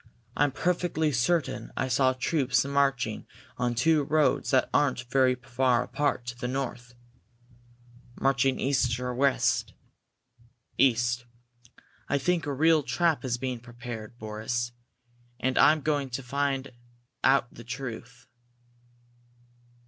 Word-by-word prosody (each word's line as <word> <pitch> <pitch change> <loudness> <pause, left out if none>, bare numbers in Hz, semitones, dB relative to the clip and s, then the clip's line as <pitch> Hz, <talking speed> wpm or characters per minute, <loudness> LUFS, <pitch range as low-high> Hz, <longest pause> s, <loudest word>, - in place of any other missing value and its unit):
I'm 145 -1 +2
perfectly 170 -1 0
certain 140 +5 0
I - - 0
saw 130 0 +3
troops 130 -1 +1
marching 140 -5 0 0.3
on 120 -1 0
two 155 +5 +3
roads 150 +1 +1
that 130 -2 +3
aren't 130 -3 +2
very 130 -1 +4
far 125 0 +1
apart, 145 -4 -1
to 120 0 -5
the 125 0 -4
north." 125 -2 -4 1.2
"Marching 135 -1 +2
east 125 -3 +1
or 125 0 -3
west?" 135 +1 +1 1.0
"East. 120 -1 +2 0.8
I 145 - +2
think 170 +2 0
a - - -1
real 160 +3 +4
trap 165 +2 0
is 125 -2 -1
being 125 -1 -3
prepared, 120 -1 -9
Boris. 110 +2 -3 0.7
And 130 0 0
I'm 155 0 +5
going 145 -2 0
to 130 +2 -5
try - - -18
to - - -18
find 140 -1 -1 0.5
out 135 -2 +3
the 120 - -11
truth!" 125 0 -7
130 Hz, 125 wpm, -27 LUFS, 120-140 Hz, 1.2 s, I'm